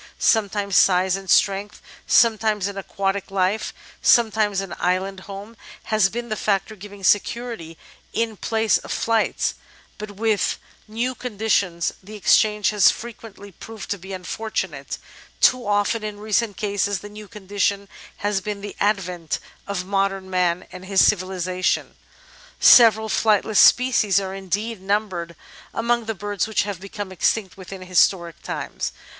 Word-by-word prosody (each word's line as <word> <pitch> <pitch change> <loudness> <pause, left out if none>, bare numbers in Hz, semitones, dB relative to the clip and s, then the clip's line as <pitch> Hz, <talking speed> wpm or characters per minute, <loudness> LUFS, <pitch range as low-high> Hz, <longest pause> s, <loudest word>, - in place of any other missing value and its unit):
Sometimes 205 -3 +1
size 185 0 +4
and 195 -1 -8
strength, 200 +1 +2 0.3
sometimes 220 -3 +3
an 200 - -6
aquatic 195 0 -3
life, 195 +2 0 0.3
sometimes 215 -4 +3
an 195 -2 -5
island 185 +2 -1
home, 200 +3 -9 0.4
has 210 -3 +4
been 235 +3 -5
the 215 - -1
factor 205 0 -1
giving 205 0 -12
security 205 -4 0 0.3
in 225 -1 -1
place 220 0 +1
of - - -9
flight, 225 -1 0 0.5
but 210 0 -6
with 210 0 0 0.3
new 235 +4 -2
conditions 205 -8 -1
the 205 +3 -11
exchange 210 0 +3
has 210 -2 +5
fre 235 - -4
quently 205 -3 -13
proved 220 -2 -8
to 200 - -2
be 190 +2 -10
unfortunate: 185 -5 -4 0.4
too 250 -4 +3
often, 205 +2 +1
in 210 -1 -5
recent 215 0 0
cases, 205 -1 -1
the 205 - -8
new 210 0 -11
condition 200 -1 -2 0.4
has 205 -1 +1
been 205 0 -5
the 205 0 -7
advent 180 -6 -1 0.3
of 195 -2 -3
modem 195 -1 -1
Man 180 -1 +1
and 185 0 -10
his 195 -1 +4
civilisation. 185 -1 0 0.6
Several 220 -2 +7
flightless 215 0 +2
species 240 -6 +5
are 190 -1 -5
indeed 195 +3 -3
numbered 190 -4 -2 0.4
among 235 0 0
the 225 0 -3
birds 205 +1 -2
which 220 - +1
have 200 -3 -5
become 200 0 -7
extinct 190 +1 0
within 190 0 -9
historic 180 -1 +1
times. - - -4
200 Hz, 140 wpm, -22 LUFS, 190-215 Hz, 0.6 s, Several